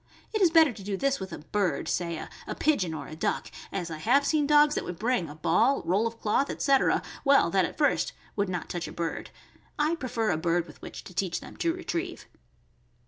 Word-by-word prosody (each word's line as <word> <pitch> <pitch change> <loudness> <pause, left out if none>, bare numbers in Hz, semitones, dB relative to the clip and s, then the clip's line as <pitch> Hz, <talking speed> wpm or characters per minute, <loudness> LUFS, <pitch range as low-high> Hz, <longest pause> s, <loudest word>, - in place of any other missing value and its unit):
It 430 - 0
is 365 - +6
better 320 -5 +5
to 210 - -11
do 200 0 -2
this 275 +3 +1
with 190 -1 -6
a - - -5
bird, 195 +3 -1
say 170 -2 -1 0.3
a - - -4
pigeon 205 - +1
or - - -6
a 155 - -8
duck, 160 - -2 0.2
as 175 -4 -3
I 155 - -5
have 275 - +3
seen 300 -1 +2
dogs 295 0 +6
that - - -1
would 180 - -6
bring 215 -5 0
a 145 - -9
ball, 170 - +2
roll 190 +7 +2
of 230 0 -8
cloth, 245 +6 +1
etc., 275 -1 +2 0.2
well, 275 - +5
that 190 -1 +3
at. - - -7
first 295 -1 +2 0.2
would 200 -2 0
not 180 -2 -3
touch 175 -1 -4
a - - -7
bird. 170 -1 -4 0.5
I 300 +2 +2
prefer 245 - -1
a 155 - 0
bird 170 +1 +1
with - - -15
which - - -8
to - - -12
teach 180 -1 -1
them - - -11
to 335 - +1
retrieve. 360 +1 -4
210 Hz, 225 wpm, -28 LUFS, 175-285 Hz, 0.5 s, is